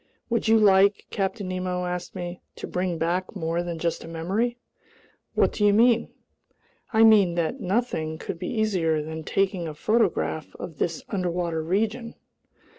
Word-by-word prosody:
"Would 230 Hz, -1 st, +1 dB
you 225 Hz, 0 st, +6 dB
like," 200 Hz, -1 st, +4 dB
Captain 195 Hz, 0 st, -2 dB
Nemo 185 Hz, 0 st, -2 dB
asked 180 Hz, 0 st, -4 dB
me, 175 Hz, 0 st, -5 dB
"to -, -, -6 dB
bring 180 Hz, -1 st, -2 dB
back 175 Hz, +5 st, -1 dB
more 165 Hz, -2 st, -1 dB
than 175 Hz, -1 st, -4 dB
just 170 Hz, +1 st, -2 dB
a -, -, -9 dB
memory?" 195 Hz, +9 st, -1 dB, 0.8 s
"What -, -, +3 dB
do 210 Hz, -, -1 dB
you 205 Hz, -1 st, +5 dB
mean?" 235 Hz, +2 st, +4 dB, 0.8 s
"I 220 Hz, 0 st, +5 dB
mean 205 Hz, -6 st, +6 dB
that 170 Hz, +10 st, -1 dB
nothing 185 Hz, -7 st, -1 dB
could 165 Hz, -, -6 dB
be 180 Hz, -, -4 dB
easier 180 Hz, -9 st, +1 dB
than 160 Hz, +1 st, -6 dB
taking 190 Hz, -1 st, 0 dB
a 155 Hz, -, -6 dB
photograph 205 Hz, -5 st, 0 dB
of 160 Hz, -5 st, -8 dB
this 165 Hz, -2 st, -1 dB
underwater 175 Hz, -4 st, -1 dB
region!" 220 Hz, +8 st, -1 dB
185 Hz, 160 wpm, -25 LUFS, 170-215 Hz, 0.8 s, you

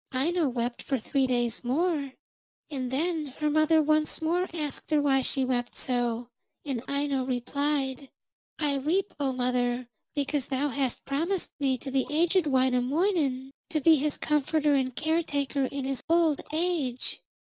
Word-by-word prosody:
Aino 310 Hz, +4 st, +1 dB
wept 240 Hz, -1 st, -2 dB
for 270 Hz, -, -1 dB
three 265 Hz, +3 st, 0 dB
days 240 Hz, -2 st, 0 dB
more, 285 Hz, +1 st, 0 dB, 0.6 s
and 260 Hz, -3 st, -3 dB
then 310 Hz, +3 st, -1 dB
her 300 Hz, -1 st, 0 dB
mother 310 Hz, +1 st, +4 dB
once 305 Hz, 0 st, +2 dB
more 345 Hz, +3 st, 0 dB
asked 300 Hz, -5 st, -4 dB
her 305 Hz, -1 st, +3 dB
why 275 Hz, -2 st, +3 dB
she 265 Hz, 0 st, 0 dB
wept 245 Hz, -1 st, -1 dB
so, 240 Hz, -2 st, -1 dB, 0.4 s
and 265 Hz, -5 st, -2 dB
Aino 280 Hz, -1 st, 0 dB
replied: 270 Hz, +1 st, -1 dB, 0.5 s
'I 285 Hz, -3 st, 0 dB
weep, 355 Hz, +9 st, 0 dB
O 275 Hz, -2 st, +1 dB
mother, 250 Hz, -1 st, 0 dB, 0.3 s
because 285 Hz, -1 st, -1 dB
thou 280 Hz, +2 st, 0 dB
hast 265 Hz, -1 st, -2 dB
promised 330 Hz, +7 st, -1 dB
me 270 Hz, -2 st, +1 dB
to 270 Hz, +2 st, -7 dB
the 265 Hz, -1 st, +1 dB
aged 335 Hz, +2 st, +2 dB
Wainamoinen, 265 Hz, +2 st, +1 dB, 0.2 s
to 320 Hz, -3 st, 0 dB
be 320 Hz, +2 st, +6 dB
his 295 Hz, +1 st, 0 dB
comforter 300 Hz, 0 st, +1 dB
and 260 Hz, -2 st, +1 dB
caretaker 290 Hz, -3 st, 0 dB
in 275 Hz, 0 st, -4 dB
his 270 Hz, -1 st, -1 dB
old 330 Hz, -3 st, +3 dB
age. 310 Hz, -7 st, -1 dB
280 Hz, 150 wpm, -28 LUFS, 255-310 Hz, 0.6 s, be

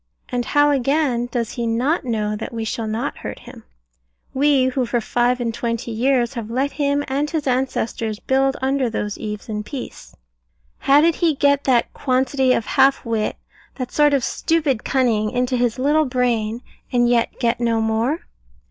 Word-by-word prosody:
and 245 Hz, -2 st, -2 dB
how 290 Hz, 0 st, +6 dB
again 270 Hz, -2 st, +1 dB
does 230 Hz, -2 st, -2 dB
he 235 Hz, -2 st, -3 dB
not 255 Hz, +9 st, 0 dB
know 215 Hz, -4 st, -1 dB
that 220 Hz, -, -6 dB
we 225 Hz, -2 st, -4 dB
shall 220 Hz, 0 st, -3 dB
not 220 Hz, +2 st, -3 dB
hurt -, -, -6 dB
him? -, -, -13 dB, 0.7 s
we, 275 Hz, -1 st, +3 dB
who 260 Hz, 0 st, 0 dB
for 240 Hz, 0 st, 0 dB
five 245 Hz, +2 st, +1 dB
and 235 Hz, -2 st, -2 dB
twenty 230 Hz, 0 st, -3 dB
years 245 Hz, +2 st, +1 dB
have 230 Hz, -4 st, -5 dB
let 265 Hz, +4 st, 0 dB
him 285 Hz, 0 st, 0 dB
and 285 Hz, +2 st, -1 dB
his 315 Hz, -3 st, -2 dB
ancestors 235 Hz, -4 st, -1 dB
build 270 Hz, +1 st, +1 dB
under 265 Hz, -2 st, +1 dB
those 210 Hz, -2 st, -4 dB
eaves 210 Hz, -2 st, -6 dB
in 210 Hz, -2 st, -3 dB
peace? 255 Hz, +4 st, -8 dB, 0.6 s
How 280 Hz, +2 st, +5 dB
did 335 Hz, +2 st, +4 dB
he 330 Hz, -4 st, +2 dB
get 285 Hz, +1 st, +2 dB
that 245 Hz, -3 st, +2 dB
quantity 260 Hz, 0 st, +1 dB
of 230 Hz, -, +1 dB
half 270 Hz, +4 st, +3 dB
wit, 225 Hz, -2 st, -1 dB, 0.4 s
that 255 Hz, -2 st, -5 dB
sort 295 Hz, -1 st, +4 dB
of 270 Hz, -, 0 dB
stupid 300 Hz, -7 st, 0 dB
cunning, 230 Hz, -5 st, +1 dB
into 250 Hz, +1 st, 0 dB
his 245 Hz, -1 st, 0 dB
little 295 Hz, +4 st, +2 dB
brain, 240 Hz, -3 st, -1 dB, 0.3 s
and 240 Hz, -1 st, +3 dB
yet 240 Hz, -1 st, +1 dB
get 235 Hz, -2 st, +1 dB
no 230 Hz, -1 st, +1 dB
more? 225 Hz, +7 st, 0 dB
250 Hz, 175 wpm, -21 LUFS, 230-275 Hz, 0.7 s, how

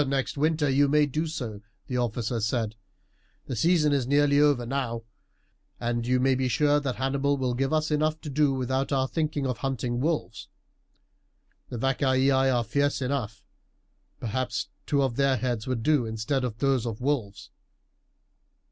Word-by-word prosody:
"Next 135 Hz, -1 st, -1 dB
winter 155 Hz, +1 st, +1 dB
you 140 Hz, +1 st, +3 dB
may 150 Hz, +1 st, +4 dB
do 155 Hz, +4 st, -2 dB
so," 120 Hz, -10 st, -5 dB, 0.2 s
the 125 Hz, -, -3 dB
officer 120 Hz, -1 st, -1 dB
said. 110 Hz, 0 st, -1 dB, 0.7 s
"The 130 Hz, -, -4 dB
season 150 Hz, +3 st, +3 dB
is 135 Hz, -4 st, 0 dB
nearly 145 Hz, +1 st, +3 dB
over 145 Hz, -5 st, +3 dB
now, 120 Hz, -3 st, -2 dB, 0.8 s
and 120 Hz, 0 st, -2 dB
you 125 Hz, 0 st, +2 dB
may 135 Hz, +1 st, +3 dB
be 130 Hz, 0 st, 0 dB
sure 145 Hz, +3 st, +3 dB
that 135 Hz, -3 st, -3 dB
Hannibal 140 Hz, +2 st, 0 dB
will 130 Hz, -2 st, -1 dB
give 135 Hz, +3 st, -1 dB
us 155 Hz, 0 st, +1 dB
enough 155 Hz, +1 st, +1 dB
to 150 Hz, -, -6 dB
do 145 Hz, 0 st, +3 dB
without 130 Hz, +1 st, -1 dB
our 135 Hz, -1 st, +1 dB
thinking 150 Hz, 0 st, -2 dB
of 125 Hz, -3 st, -2 dB
hunting 125 Hz, -3 st, -2 dB
wolves. 150 Hz, -9 st, -2 dB, 1.2 s
The 120 Hz, -, -5 dB
Vacaei 135 Hz, +1 st, +2 dB
are 130 Hz, -2 st, +2 dB
fierce 140 Hz, +5 st, 0 dB
enough. 125 Hz, -5 st, -3 dB, 0.8 s
Perhaps 125 Hz, +2 st, -2 dB, 0.2 s
two 140 Hz, -2 st, +2 dB
of 130 Hz, -3 st, -1 dB
their 140 Hz, -1 st, +3 dB
heads 120 Hz, -1 st, -2 dB
would 125 Hz, -3 st, -2 dB
do 145 Hz, -5 st, +2 dB
instead 110 Hz, +5 st, -1 dB
of 120 Hz, -3 st, -3 dB
those 135 Hz, -2 st, +1 dB
of 110 Hz, -2 st, -4 dB
wolves." 125 Hz, -7 st, -2 dB
130 Hz, 165 wpm, -27 LUFS, 120-145 Hz, 1.2 s, may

